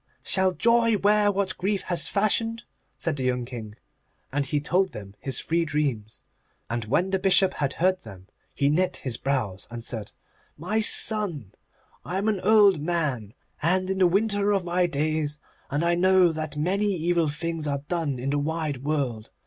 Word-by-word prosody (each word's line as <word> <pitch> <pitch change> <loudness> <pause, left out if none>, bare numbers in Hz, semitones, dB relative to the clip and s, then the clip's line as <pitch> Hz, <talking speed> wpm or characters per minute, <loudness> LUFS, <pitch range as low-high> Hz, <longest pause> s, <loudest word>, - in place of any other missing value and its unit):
'Shall 190 -1 +2
Joy 230 +4 +3
wear 205 0 +3
what 195 -1 -2
Grief 195 +1 -1
has 175 - +1
fashioned?' 225 +3 0 0.3
said 160 -4 -2
the 130 - -3
young 125 -1 0
King. 115 -4 -8 0.6
And 140 -1 0
he 145 - 0
told 185 +6 0
him 100 -2 -9
his 135 -3 0
three 170 +1 0
dreams. 140 -9 -3 0.5
And 120 -2 -2
when 175 - 0
the 190 - +1
Bishop 190 0 +3
had 140 -1 -2
heard 185 +2 +1
them 95 -1 -12 0.3
he 140 - +1
knit 180 +6 +1
his 125 -4 -2
brows, 120 -9 -2
and 120 -1 -7
said, 110 -4 -5 0.5
'My 185 +8 -1
son, 205 - +2 0.5
I 180 - -4
am 200 +3 -1
an 210 -3 +1
old 205 -3 +5
man, 145 -10 -1 0.3
and 185 +4 +2
in 190 - -2
the 185 - +5
winter 205 +2 +1
of 195 -3 0
my 175 +1 +1
days, 155 -1 -1 0.3
and 145 +4 -1
I 170 - +3
know 185 0 +4
that 155 -2 -4
many 190 +7 0
evil 170 -1 +1
things 160 +1 -3
are 140 -1 -2
done 160 -6 -2
in 130 +3 -3
the 145 - +1
wide 155 -1 -2
world. 135 -7 -2
165 Hz, 180 wpm, -25 LUFS, 140-190 Hz, 0.6 s, old